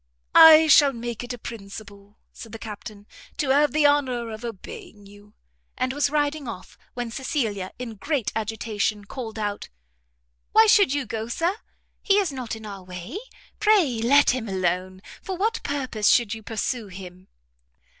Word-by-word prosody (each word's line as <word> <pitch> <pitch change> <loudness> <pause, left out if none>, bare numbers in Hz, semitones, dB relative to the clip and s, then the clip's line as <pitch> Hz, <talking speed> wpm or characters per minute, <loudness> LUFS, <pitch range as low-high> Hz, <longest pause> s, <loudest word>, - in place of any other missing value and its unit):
"I 320 0 +9
shall 290 -2 +6
make 235 -1 -5
it 245 - -6
a 245 - -5
principle," 200 -2 -10 0.2
said 225 - -11
the - - -5
captain, 210 -1 -9 0.3
"to 285 - -1
have 290 0 +4
the 305 +1 +2
honour 255 -5 +1
of 220 +2 -8
obeying 235 - -9
you." 205 +1 -17 0.4
And 255 +1 -1
was 285 0 +1
riding 295 -1 -1
off, 200 -5 -8 0.2
when 240 -1 -4
Cecilia, 225 -8 -2
in 230 -3 -7
great 285 -2 -1
agitation, 215 -1 -2
called 225 0 -7
out 205 -1 -4 0.8
"Why 445 +1 +7
should 415 -8 +5
you 285 -1 -1
go, 225 -1 -4
Sir? 335 +10 -1 0.5
he 395 -1 +3
is 390 -6 +1
not 250 -4 -5
in 220 -1 -11
our 200 -2 -8
way, 180 - -7 0.4
pray 365 - +3
let 280 +5 +5
him 245 -4 -4
alone, 185 0 -2 0.2
for 375 -1 -5
what 435 +5 0
purpose 260 -7 -2
should 235 -4 +3
you 220 - -7
pursue 225 +1 -3
him?" 185 -1 -11
235 Hz, 165 wpm, -24 LUFS, 205-285 Hz, 0.8 s, I